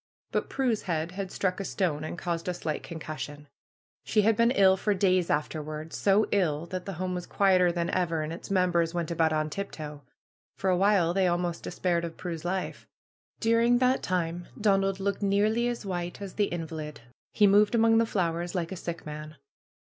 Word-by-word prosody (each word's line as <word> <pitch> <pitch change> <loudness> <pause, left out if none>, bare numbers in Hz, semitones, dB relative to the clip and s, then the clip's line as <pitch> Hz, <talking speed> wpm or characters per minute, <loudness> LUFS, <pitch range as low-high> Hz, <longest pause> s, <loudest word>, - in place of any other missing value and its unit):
But - - -1
Prue's 250 -5 0
head 165 -2 -2
had 190 0 -5
struck 185 -1 -1
a - - -2
stone 170 -6 -1
and 155 - -5
caused 170 -1 -3
a 180 - -1
slight 155 -3 -3
con 170 - -8
cussion. 150 -1 -6 0.6
She 210 -2 +2
had 220 +1 +4
been 230 +1 +4
ill 195 -6 +5
for 205 +2 0
days 185 -2 +2
afterward. 155 +1 -3
So 205 +2 +3
ill 165 -6 +1
that 180 +1 -5
the 195 - -3
home 185 +2 -3
was 180 -1 -4
quieter 185 -3 +4
than 170 0 -1
ever, 165 -4 0
and 155 +1 -4
its 170 - -9
members 175 -3 +2
went 170 -1 -2
about 165 -1 +2
on 155 0 0
tip 200 +4 -4
toe. 150 -2 -8 0.5
For 190 -1 0
a - - +3
while 190 -3 +3
they 190 0 +3
almost 175 -1 -1
de - - -4
spaired 175 -2 0
of 165 -1 -6
Prue's 170 -3 -5
life. 185 +2 -3 0.5
During 230 +2 +4
that 255 +1 +2
time 175 -1 -2
Donald 195 -2 +2
looked 200 +1 -1
nearly 210 +4 +2
as 240 -3 -3
white 175 -2 -4
as 200 -2 -7
the 205 - +2
invalid. 160 -5 -5 0.3
He 210 - +4
moved 205 +3 +5
among 225 0 +5
the 230 - +2
flowers 175 -3 -1
like 170 -1 -2
a - - -3
sick 170 0 -6
man. 155 0 -7
180 Hz, 200 wpm, -28 LUFS, 165-200 Hz, 0.6 s, ill